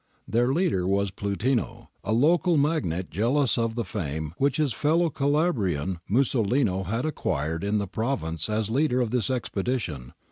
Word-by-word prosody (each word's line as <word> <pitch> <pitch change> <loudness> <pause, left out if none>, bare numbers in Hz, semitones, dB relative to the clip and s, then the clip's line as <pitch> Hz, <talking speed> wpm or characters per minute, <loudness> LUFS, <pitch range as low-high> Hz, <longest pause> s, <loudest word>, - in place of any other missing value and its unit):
Their 120 +3 +2
leader 145 - +1
was 100 0 +1
Plutino, 105 +6 -2
a 105 - -2
local 160 +7 +3
magnate 140 - 0
jealous 125 +6 +2
of 115 -1 -1
the 120 -2 -2
fame 80 -5 -4
which 140 -1 +2
his 150 -6 +1
fellow 160 +5 +2
Calabrian 115 - 0
Musolino 115 -4 +1
had 115 +7 -1
acquired 80 - -2
in 100 +1 +1
the 100 - 0
province 95 - -2
as 110 0 -1
leader 130 0 +2
of 120 -3 0
this 125 -1 0
expedition. 105 - -3
115 Hz, 150 wpm, -26 LUFS, 95-140 Hz, -, local